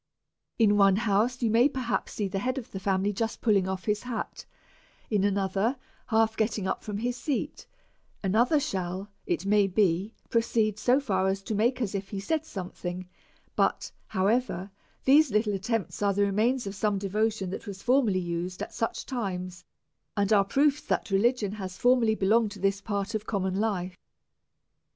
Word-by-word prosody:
In 210 -3 +4
one 195 -1 +6
house 225 +4 +1
you 225 - +2
may 240 +5 +5
perhaps 245 -8 -2
see 205 - -1
the 195 +1 -3
head 255 +5 -1
of 255 - -6
the 195 - -5
family 195 +1 0
just 225 +3 -2
pulling 200 -5 +2
off 190 -1 -4
his 210 -1 0
hat, 245 -2 -5 0.6
in 205 -3 +2
ano 200 -1 +1
ther 205 +7 0 0.3
half 220 -1 +2
getting 215 -3 0
up - - -2
from 210 -1 -4
his 240 +3 -1
seat; 290 +3 -3 0.6
another 235 - +3
shall, 190 -7 -3 0.2
it 350 - -1
may 205 0 +4
be, 195 +1 +1
proceed 225 -2 +1
so 250 +4 +3
far 190 -8 0
as 195 0 -1
to 220 - -3
make 235 +5 +1
as 205 - -3
if 195 -1 -4
he 200 - -4
said 315 +9 -1
some 185 - -6
thing; 180 0 -6 0.5
but, - - +1 0.2
however, 200 -1 0 0.3
these 290 +2 +6
little 210 -1 +1
attempts 220 +2 -2
are 200 -1 +2
the 205 - +3
re 200 - 0
mains 240 +5 +1
of 195 - -4
some 205 +1 0
devotion 200 0 -1
that 200 - -6
was 195 -1 -7
formerly 245 -6 +3
used 175 0 -3
at - - -8
such 225 - -2
times^ 185 -7 -4 0.5
and 200 +1 +2
are 200 -1 +6
proofs 280 +8 +2
that - - -2
religion 210 +1 +2
has 190 -3 -6
belonged 225 -3 +3
to 205 - -10
this 195 +1 0
part 200 0 -3
of 215 0 -3
common 190 -3 -1
life. 190 -3 -2
205 Hz, 180 wpm, -28 LUFS, 195-230 Hz, 0.6 s, one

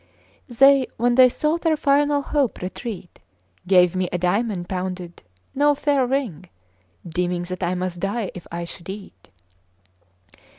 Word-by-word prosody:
They, 270 +2 +5
when 240 +1 +2
they 255 +1 +7
saw 305 +6 0
their 325 -2 +1
final 290 0 +2
hope 280 -4 0
retreat, 190 -1 -7 0.5
Gave 180 -1 +4
me 185 -1 -1
a 180 - -1
diamond, 180 +1 -1
pounded, 180 -2 -5 0.3
no 290 +1 +3
fair 280 -3 +1
ring, 220 - -3 0.6
Deeming 175 +1 -2
that 185 +1 -6
I 180 0 0
must 180 -1 -4
die 200 +2 -2
if 180 - -10
I 170 0 -4
should 170 +1 -10
eat. 195 0 -10
195 Hz, 140 wpm, -22 LUFS, 180-270 Hz, 0.6 s, they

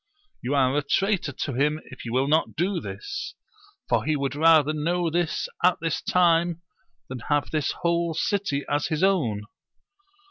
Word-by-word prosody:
You 130 +4 -1
are 130 -1 +3
a 145 - +2
traitor 190 +2 0
to 140 0 -4
him, 150 +4 +1
if 130 - -10
you 115 - -4
will 130 +3 +1
not 155 +2 +1
do 180 +2 0
this; 410 - -6 0.5
for - - +1
he 155 - 0
would 140 -2 -2
rather 155 -1 +5
know 165 +2 0
this 170 0 -1 0.2
at 180 +1 +4
this 165 -2 -2
time 170 -1 +2 0.5
than 130 -1 -6
have 145 -1 +1
this 155 -2 0
whole 170 -1 +1
city 165 -6 -1
as 145 0 0
his 155 +2 -1
own. 135 - +1
155 Hz, 170 wpm, -25 LUFS, 140-175 Hz, 0.5 s, rather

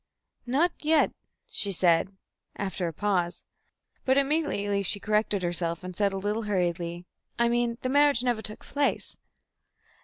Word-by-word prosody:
"Not 300 +8 +2
yet," 310 0 +3 0.3
she 440 - +2
said, 180 +1 +2 0.4
after 190 -2 -3
a - - -3
pause, 180 0 -1 0.6
but 265 +1 +2
immediately 275 -9 +1
she 200 +1 +5
corrected 210 -2 0
herself, 170 0 -1
and 185 -1 -7
said 200 +1 +1
a 195 - -4
little 205 +3 -2
hurriedly, 175 -2 -2 0.3
"I 235 - +3
mean 235 0 0
the 255 - -1
marriage 285 -3 +4
never 240 -3 0
took 215 -1 -4
place." 285 0 -1
205 Hz, 145 wpm, -27 LUFS, 180-255 Hz, 0.6 s, she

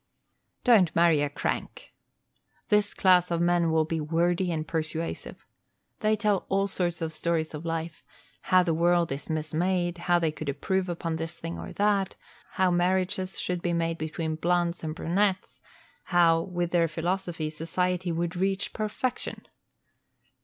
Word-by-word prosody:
Don't 210 -9 +5
marry 165 -3 +4
a 145 - 0
crank. 145 - -4 0.8
This 210 -1 +2
class 180 -2 +4
of 170 -1 0
men 175 -1 +2
will 160 -1 +2
be 160 0 -2
wordy 175 +3 +1
and 155 -2 -3
persuasive. 160 0 -4 0.5
They 215 0 +2
tell 210 -2 0
all 195 +1 +2
sorts 175 -3 -2
of 160 0 -3
stories 160 -1 -1
of 155 +2 -6
life, 165 -1 -4 0.5
how 185 -1 +6
the 170 -2 0
world 170 0 +2
is 140 +1 -4
mismade; 175 +3 -1
how 175 0 +2
they 165 -2 +1
could 155 -1 -5
improve 185 +7 -1
upon 165 -1 -2
this 165 +1 -5
thing 165 +1 -6
or - - -7
that; 200 -2 +1 0.4
how 185 -2 +2
marriages 185 +1 0
should 180 -1 -2
be 175 0 -1
made 165 0 -1
between 155 0 -3
blondes 175 +1 0
and 155 -1 -3
brunettes; 190 +4 0 0.4
how, 170 -2 +4
with 175 -1 -3
their 170 -1 +3
philosophy, 170 -1 -2
society 180 +3 -1
would 170 +1 -2
reach 190 +1 -1
perfection. 220 +4 -3
175 Hz, 155 wpm, -27 LUFS, 165-185 Hz, 0.8 s, how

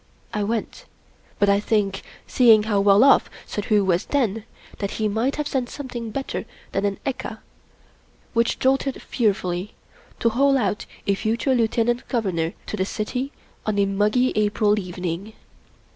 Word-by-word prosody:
I 210 - -1
went; 230 - -3 0.5
but 205 - +3
I 200 0 +4
think, 205 -2 0 0.2
seeing 225 -4 +5
how 210 -2 +1
well 200 +3 +6
off 275 - +5 0.2
Suddhoo 210 -1 +1
was 180 -1 +1
then, 225 -6 0 0.3
that 200 -1 -3
he 215 - +1
might 225 +6 0
have 300 -1 -2
sent 255 -4 -1
something 245 -5 -6
better 270 +5 -4 0.3
than 195 - 0
an 200 -1 -1
ekka, 260 -4 -3 1.0
which 230 -1 +2
jolted 270 0 +1
fearfully, 195 -4 -1 0.4
to 230 - +3
haul 275 +4 +3
out 205 -4 -1 0.2
a 200 - +2
future 225 +6 0
Lieutenant 240 0 +1
Governor 180 -8 -1
to - - -4
the 190 - 0
City 250 +7 -3 0.3
on 215 -1 -1
a 200 - +4
muggy 210 +6 +2
April 210 0 +2
evening. 180 +2 -5
215 Hz, 150 wpm, -23 LUFS, 200-245 Hz, 1.0 s, well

